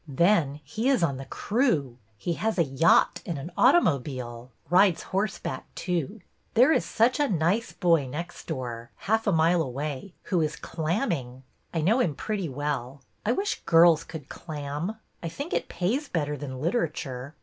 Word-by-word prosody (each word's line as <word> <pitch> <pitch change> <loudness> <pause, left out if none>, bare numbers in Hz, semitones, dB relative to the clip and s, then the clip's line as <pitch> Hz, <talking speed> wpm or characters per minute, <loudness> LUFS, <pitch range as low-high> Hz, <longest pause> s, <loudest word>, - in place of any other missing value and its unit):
Then, 150 -1 +2
he 215 - -1
is 260 -9 +3
on 140 -5 +1
the 135 - -7
crew. 155 - 0 0.2
He 170 - -2
has 220 +5 -1
a 170 - +5
yacht 140 +3 +3
and 170 - -4
an 140 +6 -6
automobile; 130 - +2 0.2
rides 180 +2 +4
horseback 195 +2 -3
too. 180 +3 -2 0.3
There 250 +6 +6
is - - +3
such 245 +4 +2
a 290 - +3
nice 185 +5 +1
boy 165 -6 +2
next 170 +7 -7
door 120 -2 -5
— - - -39
half 220 +1 +2
a - - +4
mile 165 +1 +3
away 145 +5 -4
— - - -44
who 180 -4 +1
is 155 -1 -1
clamming. 155 - -2 0.3
I 165 - -1
know 215 +11 +3
him 160 - +1
pretty 200 -3 -3
well. 135 -1 -3 0.2
I 235 - +4
wish 405 +8 -2
girls 165 -1 +6
could 160 -4 -9
clam. 150 +5 -5 0.3
I 165 - -3
think 285 - -6
it - - -1
pays 250 +11 -1
better 150 -3 -1
than 130 -2 -6
literature. 150 - -2
165 Hz, 170 wpm, -27 LUFS, 140-200 Hz, 0.3 s, There